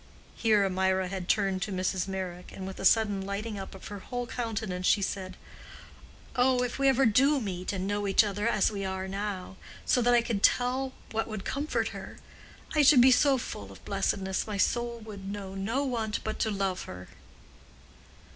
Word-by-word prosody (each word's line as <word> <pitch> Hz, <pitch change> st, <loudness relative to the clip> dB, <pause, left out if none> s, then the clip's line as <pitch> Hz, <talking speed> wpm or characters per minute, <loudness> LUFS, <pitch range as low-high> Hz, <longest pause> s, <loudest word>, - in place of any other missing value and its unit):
Here 215 Hz, -3 st, +3 dB
Mirah 190 Hz, 0 st, +1 dB
had 190 Hz, -1 st, -5 dB
turned 195 Hz, -3 st, +1 dB
to 205 Hz, -, -2 dB
Mrs. 185 Hz, 0 st, -1 dB
Meyrick, 185 Hz, -2 st, -5 dB
and 190 Hz, -, -7 dB
with 190 Hz, 0 st, -7 dB
a -, -, -3 dB
sudden 205 Hz, -2 st, +3 dB
lighting 200 Hz, +2 st, -4 dB
up 195 Hz, -, -8 dB
of 190 Hz, -, -10 dB
her 205 Hz, -1 st, -6 dB
whole 245 Hz, +5 st, -4 dB
countenance, 220 Hz, -6 st, -3 dB
she 200 Hz, -, +4 dB
said, 185 Hz, -1 st, -4 dB, 1.0 s
"Oh, 250 Hz, 0 st, +3 dB
if 250 Hz, +2 st, -3 dB
we 275 Hz, -, +3 dB
ever 270 Hz, 0 st, +4 dB
do 275 Hz, +6 st, +4 dB
meet 185 Hz, -5 st, -3 dB
and 190 Hz, -2 st, -3 dB
know 205 Hz, 0 st, -1 dB
each 195 Hz, +3 st, +5 dB
other 205 Hz, +1 st, -1 dB
as 210 Hz, -2 st, +2 dB
we 200 Hz, -2 st, -4 dB
are 190 Hz, 0 st, -3 dB
now, 195 Hz, -1 st, -4 dB, 0.3 s
so 250 Hz, -, +3 dB
that 240 Hz, +1 st, +4 dB
I 235 Hz, -, +4 dB
could 220 Hz, -4 st, -2 dB
tell 260 Hz, +3 st, +2 dB, 0.2 s
what 225 Hz, 0 st, -1 dB
would 215 Hz, -3 st, -6 dB
comfort 290 Hz, +3 st, -1 dB
her—I 305 Hz, -, -6 dB
should 285 Hz, -3 st, +7 dB
be 260 Hz, +2 st, +7 dB
so 275 Hz, +1 st, +5 dB
full 100 Hz, -, -6 dB
of 95 Hz, -, -15 dB
blessedness 195 Hz, -1 st, -1 dB
my 210 Hz, -2 st, -3 dB
soul 235 Hz, +3 st, 0 dB
would 200 Hz, -3 st, -8 dB
know 200 Hz, -2 st, -6 dB
no 220 Hz, +8 st, -1 dB
want 225 Hz, -5 st, -2 dB
but 215 Hz, -, -4 dB
to 220 Hz, -, +1 dB
love 195 Hz, -3 st, -2 dB
her!" 90 Hz, 0 st, -9 dB
205 Hz, 190 wpm, -29 LUFS, 190-235 Hz, 1.0 s, should